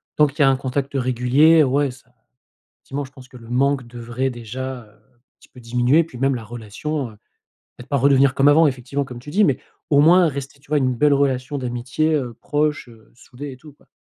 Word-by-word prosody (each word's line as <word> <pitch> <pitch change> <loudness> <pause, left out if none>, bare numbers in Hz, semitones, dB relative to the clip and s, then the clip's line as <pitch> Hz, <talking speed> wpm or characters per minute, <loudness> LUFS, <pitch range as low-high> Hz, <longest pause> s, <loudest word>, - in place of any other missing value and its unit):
Tant 150 - +5
qu'il 145 +2 -5
y - - +7
a 135 - +6
un 135 - +3
contact 135 +1 -3
régulier 135 +5 +4
ouais 140 +1 +1
ça 125 -1 -15 0.6
effectivement 140 +1 -6
je 130 - -16
pense 130 -2 -15
que 125 -1 -14
le 115 -1 -14
manque 135 0 +1
devrait 120 +2 -4
déjà, 125 +1 -6
heu, - - -21
un 110 +4 -32
petit - - -21
peu 125 - -15
diminuer. 125 +6 +2
Puis 155 -6 -12
même 135 +2 +1
la 120 - -5
relation, 120 +4 -5
heu, - - -17 0.6
peut-être 125 +1 -13
pas 140 - +1
redevenir 135 0 +4
comme 140 +1 +3
avant 155 +2 +6
effectivement 135 +1 -3
comme 125 -2 -9
tu 125 - -11
dis, 210 +5 +3
mais 140 -9 +2 0.3
au 145 -1 +5
moins 175 +3 +6
rester, 140 -1 -6
tu 145 - -25
vois, 150 - +2
une 130 -3 +1
belle 145 +4 +3
relation 135 0 0
d'amitié, 130 +5 -1
heu, 125 -6 -2
proche, 150 -3 -1
heu, 115 -2 -19
soudée 135 +4 -10
et 130 - -11
tout 150 +2 -15
quoi. - - -29
130 Hz, 225 wpm, -21 LUFS, 125-145 Hz, 0.6 s, y